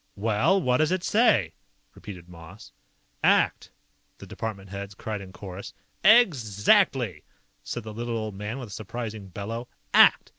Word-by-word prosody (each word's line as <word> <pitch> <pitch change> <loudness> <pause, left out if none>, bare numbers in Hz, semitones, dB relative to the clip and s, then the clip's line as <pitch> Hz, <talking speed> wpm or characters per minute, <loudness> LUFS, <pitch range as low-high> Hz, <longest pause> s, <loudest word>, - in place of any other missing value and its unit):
"Well, 115 - +2
what 125 -7 +2
does 155 +3 +1
it 185 -1 -1
say?" 120 - +3 0.4
repeated 90 -4 -11
Moss. 85 -2 -13 0.5
"ACT!" - - +2 0.5
The - - -11
department 100 -4 -6
heads 100 0 -7
cried 105 -1 -5
in 95 -1 -10
chorus. 95 +1 -9 0.3
"Exactly!" 135 - +3 0.4
said 120 - -6
the 110 0 -8
little 120 +1 -3
old 110 -2 -4
man 105 +5 -5
with 125 -5 -7
a - - -12
surprising 110 0 -6
bellow. 110 +6 -6 0.3
"ACT! - - +6
110 Hz, 145 wpm, -26 LUFS, 100-125 Hz, 0.5 s, ACT